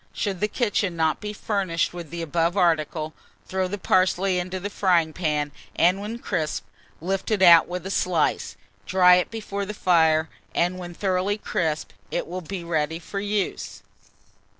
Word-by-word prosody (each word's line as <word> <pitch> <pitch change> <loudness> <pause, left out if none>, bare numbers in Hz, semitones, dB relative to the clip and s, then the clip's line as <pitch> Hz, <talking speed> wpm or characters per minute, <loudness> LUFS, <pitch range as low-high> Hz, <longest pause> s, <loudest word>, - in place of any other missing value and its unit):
Should 195 -4 -2
the 210 - +1
kitchen 210 -5 0
not 160 -1 +1
be 210 0 -4
furnished 195 -6 -1
with 170 -3 -7
the 170 0 -5
above 165 +3 0
article, 160 -3 +1 0.3
throw 190 0 -1
the 205 +3 -4
parsley 185 0 +2
into 185 +1 -4
the 205 +3 -5
frying 170 -6 +2
pan, 150 -4 -1 0.2
and 180 +3 +3
when 215 +3 -5
crisp, 170 -9 -2 0.3
lift 190 +3 -2
it 210 -4 +2
out 170 -2 +8
with 180 0 -5
a 190 - -4
slice, 180 -4 0 0.3
dry 180 -1 +6
it 180 - 0
before 210 -3 -4
the 210 +2 -5
fire, 160 -4 +3 0.3
and 180 +2 +1
when 175 -1 -8
thoroughly 190 +2 0
crisp, 160 -6 -2 0.2
it - - -2
will 180 +2 -5
be 180 +1 -6
ready 160 -1 -1
for 185 +4 -6
use. 205 -1 -3
180 Hz, 170 wpm, -24 LUFS, 165-195 Hz, 0.3 s, out